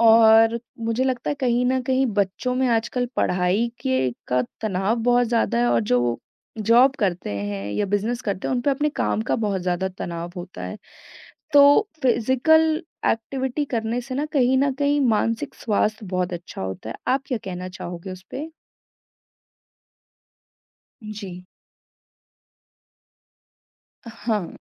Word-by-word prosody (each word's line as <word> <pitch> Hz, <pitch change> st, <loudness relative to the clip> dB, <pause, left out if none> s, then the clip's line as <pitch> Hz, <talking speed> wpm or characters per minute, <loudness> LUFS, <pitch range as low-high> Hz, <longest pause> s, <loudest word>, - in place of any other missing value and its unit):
और 225 Hz, 0 st, +6 dB, 0.2 s
मुझे 230 Hz, +3 st, 0 dB
लगता 255 Hz, -2 st, -1 dB
है -, -, 0 dB
कहीं 245 Hz, -1 st, +2 dB
न 260 Hz, +1 st, +2 dB
कहीं 260 Hz, +1 st, +1 dB
बच्चों 205 Hz, +5 st, 0 dB
में 260 Hz, +1 st, +1 dB
आजकल 235 Hz, +2 st, 0 dB
पढ़ाई 180 Hz, +6 st, +1 dB
के 130 Hz, 0 st, +1 dB, 0.2 s
का 125 Hz, 0 st, +2 dB, 0.2 s
तनाव 205 Hz, +2 st, 0 dB
बहुत 245 Hz, 0 st, +4 dB
ज़्यादा 230 Hz, -, +1 dB
है 120 Hz, -, +3 dB
और 120 Hz, -, +3 dB
जो 125 Hz, 0 st, +4 dB
वो 120 Hz, -1 st, 0 dB, 0.4 s
जॉब 235 Hz, +5 st, +5 dB
करते 185 Hz, -, -1 dB
हैं 100 Hz, 0 st, -4 dB
या 205 Hz, -, 0 dB
बिज़नेस 215 Hz, +5 st, -1 dB
करते 200 Hz, -3 st, -3 dB
हैं, -, -, 0 dB
उनपे 250 Hz, +3 st, +1 dB
अपने 290 Hz, +2 st, +1 dB
काम 220 Hz, -, -1 dB
का -, -, +3 dB
बहुत 195 Hz, -2 st, -1 dB
ज़्यादा 180 Hz, +1 st, -1 dB
तनाव 170 Hz, 0 st, -5 dB
होता 175 Hz, +1 st, -8 dB
है, -, -, -6 dB, 0.8 s
तो 285 Hz, +8 st, +6 dB
फिज़िकल 310 Hz, +7 st, +3 dB, 0.3 s
एक्टिविटी 260 Hz, +5 st, -2 dB
करने 225 Hz, +1 st, -1 dB
से 255 Hz, +2 st, -6 dB
ना 290 Hz, +2 st, -1 dB
कहीं 260 Hz, -2 st, +3 dB
न 275 Hz, 0 st, +2 dB
कहीं 285 Hz, +1 st, +1 dB
मानसिक 225 Hz, 0 st, 0 dB
स्वास्थ्य 215 Hz, 0 st, -1 dB
बहुत 180 Hz, -1 st, -2 dB
अच्छा 170 Hz, -, -7 dB
होता 95 Hz, +3 st, -5 dB
है। -, -, -6 dB
आप 265 Hz, +1 st, +2 dB
क्या 250 Hz, -4 st, -1 dB
कहना 185 Hz, -1 st, -5 dB
चाहोगे 175 Hz, +2 st, -7 dB
उसपे? 230 Hz, -, -7 dB, 2.5 s
जी। 200 Hz, -4 st, -8 dB, 2.6 s
अ, -, -, -6 dB, 0.2 s
हाँ। 210 Hz, -7 st, -1 dB
225 Hz, 145 wpm, -23 LUFS, 185-255 Hz, 2.6 s, और